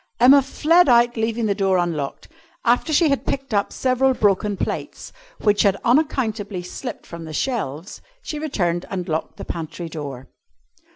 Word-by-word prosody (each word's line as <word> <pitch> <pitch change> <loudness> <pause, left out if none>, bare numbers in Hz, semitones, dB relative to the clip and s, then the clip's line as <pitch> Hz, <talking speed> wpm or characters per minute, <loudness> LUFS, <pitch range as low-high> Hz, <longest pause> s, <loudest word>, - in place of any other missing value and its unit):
Emma 265 +4 +7
fled 310 +4 +3
out, 240 0 +5
leaving 225 0 -1
the 205 - +2
door 195 -2 +1
unlocked. 165 -6 -2 0.4
After 245 +6 +2
she 310 +1 +4
had 275 - 0
picked 270 -3 -3
up 200 -1 +1
several 260 0 +1
broken 205 -1 +1
plates, - - -5 0.3
which 205 -1 +3
had 200 -1 +3
unaccountably 225 - 0
slipped 245 +8 -7
from 170 -1 -9
the 155 - -8
shelves, 180 - -3 0.2
she 300 - -5
returned 175 - -1
and 180 -3 -4
locked 160 0 -3
the - - -7
pantry 165 0 -6
door. 140 -5 -7
210 Hz, 160 wpm, -22 LUFS, 175-255 Hz, 0.4 s, Emma